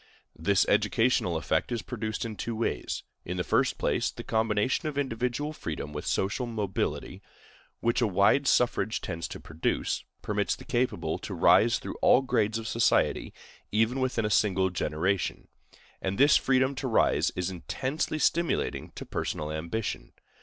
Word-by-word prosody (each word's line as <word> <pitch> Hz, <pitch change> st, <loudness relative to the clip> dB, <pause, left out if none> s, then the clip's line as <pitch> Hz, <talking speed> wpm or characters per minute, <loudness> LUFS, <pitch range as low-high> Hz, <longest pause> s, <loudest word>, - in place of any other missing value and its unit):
This 95 Hz, +5 st, +2 dB
educational 115 Hz, -8 st, +2 dB
effect 80 Hz, +6 st, -1 dB
is 120 Hz, -2 st, -2 dB
produced 110 Hz, -2 st, -4 dB
in 110 Hz, -2 st, -5 dB
two 115 Hz, +2 st, -4 dB
ways: 115 Hz, -, -2 dB, 0.2 s
In 90 Hz, +1 st, -4 dB
the 90 Hz, -, 0 dB
first -, -, +1 dB
place, -, -, 0 dB
the -, -, -8 dB
combination 110 Hz, +6 st, +1 dB
of 150 Hz, -2 st, -4 dB
individual 130 Hz, +2 st, -1 dB
freedom 75 Hz, -, -5 dB
with 75 Hz, -, -5 dB
social 100 Hz, +6 st, 0 dB
mobility, 105 Hz, -5 st, -3 dB, 0.6 s
which 120 Hz, +2 st, +1 dB
a 120 Hz, -, +3 dB
wide 100 Hz, +8 st, +3 dB
suffrage 115 Hz, -3 st, +2 dB
tends 85 Hz, -2 st, -4 dB
to -, -, -8 dB
produce, 80 Hz, 0 st, -2 dB, 0.2 s
permits -, -, 0 dB
the -, -, -13 dB
capable 85 Hz, -10 st, -1 dB
to -, -, -6 dB
rise -, -, +5 dB
through -, -, -7 dB
all 135 Hz, -, +5 dB
grades 115 Hz, -4 st, +1 dB
of 115 Hz, 0 st, -5 dB
society, 115 Hz, +1 st, +2 dB, 0.4 s
even 115 Hz, +5 st, +2 dB
within 125 Hz, -4 st, 0 dB
a 105 Hz, -, -1 dB
single 95 Hz, -3 st, +2 dB
generation; 90 Hz, +2 st, -1 dB, 0.5 s
and 95 Hz, +1 st, -2 dB
this 140 Hz, +2 st, +6 dB
freedom 130 Hz, +1 st, +3 dB
to 135 Hz, 0 st, -4 dB
rise 115 Hz, -, +3 dB
is 90 Hz, 0 st, -2 dB
intensely 130 Hz, -, -3 dB
stimulating 170 Hz, +2 st, 0 dB
to -, -, -7 dB
personal 75 Hz, 0 st, -3 dB
ambition. 85 Hz, +8 st, -4 dB
110 Hz, 155 wpm, -28 LUFS, 95-125 Hz, 0.6 s, this